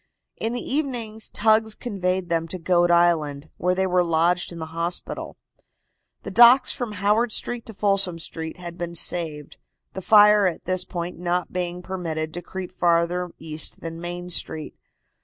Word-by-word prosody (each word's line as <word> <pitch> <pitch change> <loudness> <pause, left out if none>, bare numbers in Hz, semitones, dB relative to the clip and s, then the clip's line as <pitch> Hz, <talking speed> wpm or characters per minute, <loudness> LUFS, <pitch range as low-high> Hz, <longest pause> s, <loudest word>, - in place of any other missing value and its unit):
In 225 +1 -2
the 245 - -3
evening 240 -7 -3
tugs 220 0 +2
conveyed 185 -5 -2
them 165 -1 0
to 185 - -3
Goat 175 0 +2
Island, 160 -4 +2
where 180 +1 +1
they 190 +1 +1
were 180 -1 +2
lodged 170 +2 +1
in 170 - -8
the 160 - -5
hospital. 170 +1 -3 0.9
The - - -6
docks 245 +2 +7
from 240 -4 -4
Howard 210 +4 +1
Street 240 +2 -3
to 225 - -7
Folsom 195 -4 +1
Street 160 -1 -6
had 175 -1 -8
been 170 0 -4
saved, 160 -4 -2 0.4
the 190 - -5
fire 210 0 +6
at 175 - -4
this 185 0 -1
point 175 -1 -5
not 175 0 -1
being 180 0 -3
permitted 160 -4 -4
to 175 - -5
creep 185 0 -7
farther 175 0 +1
east 155 -1 -2
than 165 0 -6
Main 175 +1 -5
Street. 155 -2 -1
180 Hz, 165 wpm, -24 LUFS, 170-205 Hz, 0.9 s, docks